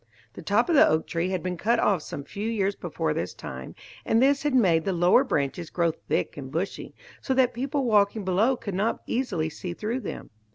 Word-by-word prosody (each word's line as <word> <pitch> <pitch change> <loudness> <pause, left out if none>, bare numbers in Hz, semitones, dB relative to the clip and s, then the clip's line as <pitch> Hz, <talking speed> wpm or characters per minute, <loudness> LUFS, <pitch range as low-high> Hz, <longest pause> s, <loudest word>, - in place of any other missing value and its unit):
The - - -9
top - - +2
of 345 - +1
the 295 - +7
oak 155 +1 +1
tree 170 +2 -2
had 185 -3 -2
been 180 -1 -3
cut 230 +7 +2
off 200 -6 +2
some 140 - -7
few 205 +8 -4
years 200 -3 0
before - - -2
this - - -4
time, - - -8 0.3
and 225 - +2
this 275 +2 +3
had 290 -3 0
made 175 -10 +4
the 195 - -1
lower 175 +9 +4
branches 155 - -2
grow 170 -2 +1
thick 155 - -3
and 135 -2 -7
bushy, 170 +6 -4 0.3
so 265 - -1
that 255 -1 +3
people 270 +2 -2
walking 210 -2 +2
below 215 +8 +2
could 200 -4 -6
not 205 +5 -1
easily 200 -11 -1
see 175 +3 -6
through 225 +6 -2
them. 220 - -7
200 Hz, 215 wpm, -26 LUFS, 175-245 Hz, 0.3 s, the